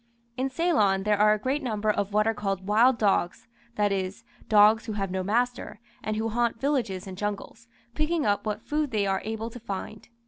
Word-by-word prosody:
In 260 +1 -1
Ceylon 255 - +2
there 210 0 +1
are 210 0 +6
a - - -6
great 265 +7 -1
number 215 -4 0
of 205 -1 -2
what 210 +1 +2
are 225 - +2
called 195 -3 -3
wild 230 +5 +4
dogs, 195 -4 0 0.3
that 205 -1 +1
is, 190 0 -3 0.3
dogs 215 +2 +5
who 220 - -3
have 195 -2 -3
no 190 0 -1
master, 240 +3 -1 0.2
and 215 - -3
who 220 +1 -1
haunt 235 0 0
villages 240 -10 -1
and 190 -1 -7
jungles, 210 +3 -5 0.3
picking 305 +3 0
up 205 -1 +1
what 210 0 -3
food 300 -1 -1
they 215 -4 0
are 195 -1 0
able 220 +1 -4
to 245 - -9
find. 215 0 -7
215 Hz, 205 wpm, -26 LUFS, 205-240 Hz, 0.3 s, are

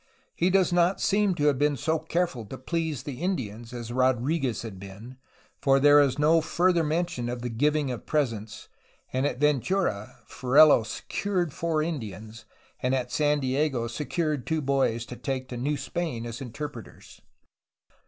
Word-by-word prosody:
He 175 - +1
does 185 -1 +3
not 175 +2 +3
seem 200 -2 +2
to 145 - -2
have 145 -3 +3
been 145 -1 +2
so 160 +6 0
careful 160 -5 -1
to 130 - -7
please 160 0 -3
the 135 -1 -7
Indians 120 - -3
as 120 -1 -6
Rodriguez 130 +1 +1
had 105 -5 -8
been, 100 +7 -11 0.4
for 135 0 +4
there 145 +1 +7
is 140 -2 +3
no 160 +3 +4
further 175 +1 +2
mention 155 -6 -1
of 120 0 -5
the 125 - -2
giving 145 +3 +1
of 120 - -7
presents, 110 -8 -2 0.5
and 130 +2 +1
at 130 - -4
Ventura 150 - 0
Ferrelo 140 +1 +5
"secured 175 - -2
four 160 -2 0
Indians, 110 - -6
'^ - - -32
and 125 +1 +1
at 125 -2 -3
San 150 -1 +1
Diego 130 -2 0
"secured 150 +2 -2
two 160 -1 0
boys 130 -4 +1
to 125 - -8
take 130 0 -4
to 125 - -6
New 145 +4 -1
Spain' 135 -3 -4
as 120 +3 -6
interpreters.' 125 -1 -8
140 Hz, 165 wpm, -27 LUFS, 120-160 Hz, 0.5 s, there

